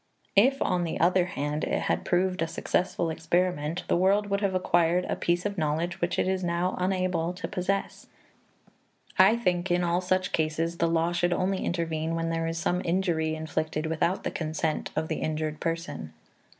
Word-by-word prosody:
If, 260 +7 +5
on 180 -1 +1
the 165 - -3
other 180 +1 +4
hand, 150 -4 -3
it - - 0
had - - -1
proved 180 0 +1
a 165 - +1
successful 170 0 -1
experiment, 165 -1 0
the - - +2
world 200 +3 +2
would 200 0 +1
have 195 -2 0
acquired 175 -1 +2
a - - -1
piece 175 +2 0
of 200 -2 -2
knowledge 160 +3 -1
which 175 +1 0
it - - +1
is 190 0 0
now 175 +1 0
unable 180 -2 0
to 180 - -5
possess. 195 +2 -2 1.1
I 195 +4 +7
think 180 -5 0
in 175 0 +2
all 175 +1 +1
such 185 0 0
cases 160 +2 0
the 170 - +3
law 165 +1 +1
should 175 0 +1
only 185 +2 0
intervene 165 -2 -1
when 165 0 -1
there 165 0 -1
is 165 0 -3
some 175 +2 0
injury 170 -3 0
inflicted 155 0 -2
without 160 +3 0
the - - -2
consent 155 -1 -2
of 160 0 -1
the - - -2
injured 155 0 -2
person. 165 - -4
175 Hz, 185 wpm, -27 LUFS, 160-185 Hz, 1.1 s, I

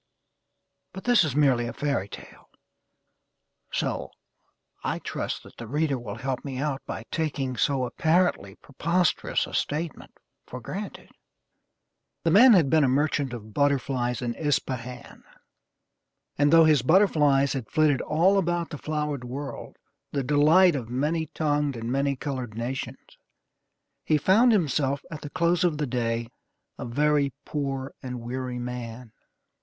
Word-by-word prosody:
But 190 - -8
this 245 -5 +5
is 145 -4 -2
merely 130 -5 +3
a 120 - -5
fairy 140 -8 -2
tale; - - -12 1.2
so, - - -2 0.7
I - - -1
trust - - -4
that - - -16
the 115 - -8
reader 145 +1 0
will 115 -3 -6
help 130 +2 -3
me 135 -3 -5
out 140 0 -2
by 110 - -5
taking 140 -5 -2
so 130 +2 +1
apparently 160 - +1
preposterous 170 +8 0
a - - -11
statement 155 +1 -3 0.3
for 125 - -7
granted. 195 - -7 1.1
The 165 - +2
man 235 +7 +8
had 170 -8 +5
been 155 +2 +4
a - - +4
merchant 140 0 +1
of 110 -3 -8
butterflies 130 -3 0
in 120 -1 -1
Ispahan, 125 -3 -3 1.1
and, 145 0 +3
though 165 -1 +7
his 150 -4 +4
butterflies 145 -4 +3
had 130 -6 -5
flitted 155 -3 +2
all 180 +6 +3
about 175 -2 -1
the 150 - -6
flowered 150 -3 -3
world, 135 +3 -7 0.3
the 140 -2 -1
delight 155 +6 +5
of 120 -5 -4
many 150 +6 -1
tongued 145 -2 -1
and 115 +1 -4
many 140 +1 +1
colored 130 -5 -5
nations, 120 +3 -6 0.8
he 155 - +2
found 215 - +4
himself 145 -8 +1
at 150 - -7
the 145 - -7
close 170 +4 +1
of 170 -4 +1
the 150 - -1
day 115 -2 -1 0.5
a - - -4
very 145 +2 +1
poor 135 -2 -3
and 125 -2 -5
weary 125 +1 -4
man. 120 -1 -6
140 Hz, 145 wpm, -26 LUFS, 125-155 Hz, 1.2 s, man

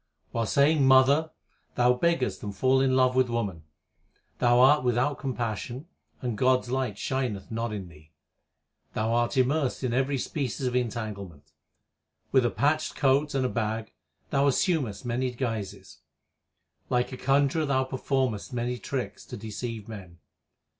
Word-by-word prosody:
While 115 -1 -1
saying 145 +3 +3
Mother, 135 +4 +5 0.5
thou 125 0 +4
beggest 165 0 0
and 100 -1 -6
fallest 130 +4 +3
in 130 -1 +2
love 130 -1 +3
with 130 -1 +3
woman. 100 -9 -3 0.7
Thou 120 0 +4
art 135 +3 +6
without 125 +3 +1
compassion 125 - -4 0.4
and 120 -4 -3
God 130 0 +4
s - - -11
light 130 -5 -1
shineth 125 -8 -3
not 115 0 -2
in 100 -4 -5
thee. 80 -2 -17 0.8
Thou 110 +1 0
art 120 +3 +1
immersed 135 +1 +1
in 125 -2 0
every 135 +2 +1
species 130 -2 -3
of 125 0 -1
entanglement. 100 -10 -4 0.8
With 130 -3 +4
a - - 0
patched 155 +4 0
coat 140 +2 +2
and 130 -1 +1
a - - +1
bag 110 -1 -3 0.4
thou 140 0 +3
assumest 140 - 0
many 125 +2 -1
guises. 115 -5 -5 0.9
Likeaconjurer 135 +4 +1
thouperformest 130 -3 -1
manytricks 125 -2 -3
to - - -7
deceive 110 +1 -6
men. 95 -6 -10
125 Hz, 140 wpm, -27 LUFS, 110-135 Hz, 0.9 s, art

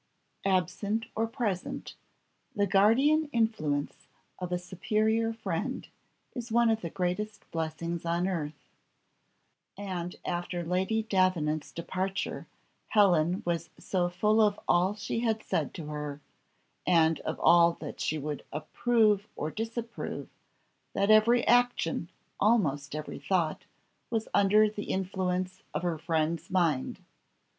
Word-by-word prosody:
Absent 200 +4 0
or 225 +1 +1
present, 215 -6 -3 0.6
the 205 -1 +2
guardian 260 +11 +4
influence 155 - -1 0.3
of 180 -1 -4
a 180 - +1
superior 215 +5 0
friend 225 0 -3 0.5
is 240 -2 -6
one 235 0 +4
of 220 0 0
the 170 - -4
greatest 190 +5 -3
blessings 165 +1 -3
on 170 +2 0
earth, 155 -5 -4 1.1
and 180 -3 -4
after 175 0 -2
Lady 190 +6 0
Davenant's 180 -7 +1
departure 190 +3 -3 0.4
Helen 180 -4 +3
was 170 -1 -1
so 180 -2 0
full 210 +5 +3
of 210 -1 +3
all 185 +4 +3
she 220 - -3
had 225 -2 0
said - - -1
to 165 - -6
her, 150 -1 -5 0.7
and 165 -2 +4
of - - -4
all 170 0 +6
that 155 -3 -8
she 155 - 0
would 150 -1 -4
approve 210 +6 +2
or 155 - -3
disapprove, 230 +1 -5 0.6
that 200 +2 +2
every 230 +3 +5
action, 245 -9 +2 0.3
almost 150 -11 +2
every 155 0 -5
thought, 155 +2 0 0.4
was 225 -1 -1
under 210 +2 +5
the 210 -1 -5
influence 185 -1 -2
of - - -1
her 170 -3 -1
friend's 165 +2 -1
mind. 170 -8 0
185 Hz, 125 wpm, -29 LUFS, 165-215 Hz, 1.1 s, all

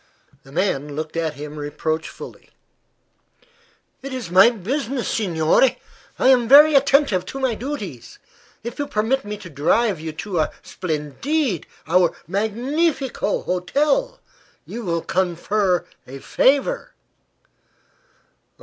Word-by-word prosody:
The 135 - -17
man 145 -4 -1
looked 155 +1 -5
at 160 -2 -1
him 150 +1 -8
reproachfully. 155 +2 -5 1.5
"It 275 +1 -7
is 250 -9 -5
my 190 +5 +7
business, 250 +4 -3
signore. 180 +4 +2 0.4
I 260 - +3
am 245 -3 +4
very 295 +4 +8
attentive 275 -8 +3
to 270 - -6
my 260 -3 +1
duties. 215 - -6 0.5
If 235 +4 -7
you 290 - -1
permit 230 +6 0
me 210 0 -5
to 190 - -11
drive 170 - +1
you 160 0 -5
to 180 +2 -3
our 155 - +1
splendide 180 - -2 0.2
our 175 0 +3
magnifico 245 - -1
hotel 295 - 0 0.5
you 235 - -7
will 170 -4 -1
confer 185 +1 0 0.2
a 135 +2 -8
favor." 280 - +1
205 Hz, 115 wpm, -21 LUFS, 165-270 Hz, 1.5 s, very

